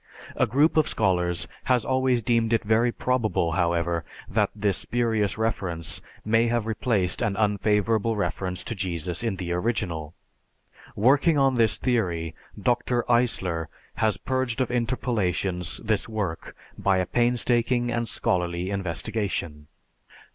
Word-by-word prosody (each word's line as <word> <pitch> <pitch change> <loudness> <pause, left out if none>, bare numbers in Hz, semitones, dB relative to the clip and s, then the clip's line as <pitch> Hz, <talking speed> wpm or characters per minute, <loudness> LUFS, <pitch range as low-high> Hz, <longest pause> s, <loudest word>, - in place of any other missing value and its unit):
A - - +2
group 145 +8 +3
of 155 - +4
scholars 90 -2 0 0.2
has 125 -3 +2
always 130 -2 +1
deemed 115 0 +2
it 115 - +2
very 110 +3 +3
probable, 110 -10 0
however, 85 -1 0 0.2
that - - +1
this 100 -3 +1
spurious 110 -4 0
reference 90 -7 -2 0.2
may 115 +2 +3
have 115 -2 0
replaced 110 -4 0
an 100 -1 0
unfavorable 105 +1 +1
reference 95 -3 -2
to - - -4
Jesus 90 -4 -2
in 115 -4 -1
the 90 -2 -4
original. 90 -5 -2 0.8
Working 140 +8 +4
on 135 -1 +4
this 115 -3 +3
theory, 85 -10 -1 0.3
Dr. 120 +2 +1
Eisler 95 -9 +1 0.3
has 110 -3 +2
purged 130 -1 -2
of 130 -1 0
interpolations 105 -7 -1
this 110 0 0
work 100 -7 -4 0.2
by 95 -1 +2
a 90 - +1
painstaking 120 +1 +1
and 115 -1 -1
scholarly 90 0 -1
investigation. 90 -4 -3
110 Hz, 130 wpm, -25 LUFS, 90-120 Hz, 0.8 s, of